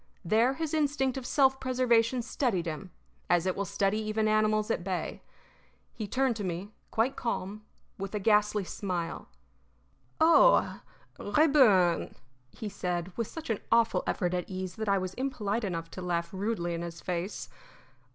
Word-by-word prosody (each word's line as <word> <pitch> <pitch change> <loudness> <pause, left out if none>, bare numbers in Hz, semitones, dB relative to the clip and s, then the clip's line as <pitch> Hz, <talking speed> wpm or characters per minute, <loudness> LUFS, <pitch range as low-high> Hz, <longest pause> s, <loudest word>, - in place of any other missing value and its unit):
There 230 +8 +3
his 320 0 -3
instinct 285 -4 +1
of 260 -2 -5
self 265 -2 +3
preservation 250 -1 +2
steadied 225 - -1
him, 165 +3 -5 0.4
as 175 0 +3
it 185 - 0
will 200 - -2
steady 200 +2 0
even 215 0 0
animals 215 0 +2
at - - -1
bay. 185 -1 -3 0.7
He 215 - -5
turned 260 +2 +1
to 210 - -4
me, 185 +3 -4 0.2
quite 230 +4 +1
calm, 215 -2 -3 0.4
with 195 +2 -4
a - - 0
ghastly 210 0 +3
smile. 180 -3 -4 0.9
"Oh, 335 +10 +5 0.4
Rayburn!" 205 - +4 0.3
he 215 - -7
said, 180 -2 -3
with 230 -2 -2
such 320 -7 -5
an 215 - -1
awful 230 0 +4
effort 180 -2 0
at 180 -1 -2
ease 185 -1 -4
that 220 -1 -2
I 200 - +4
was 185 -1 -3
impolite 235 -5 -1
enough 165 -4 -3
to 185 - -7
laugh 175 +1 -2
rudely 190 -3 -2
in 170 - -3
his 170 -1 -6
face. 180 +2 -4
210 Hz, 160 wpm, -29 LUFS, 180-240 Hz, 0.9 s, Oh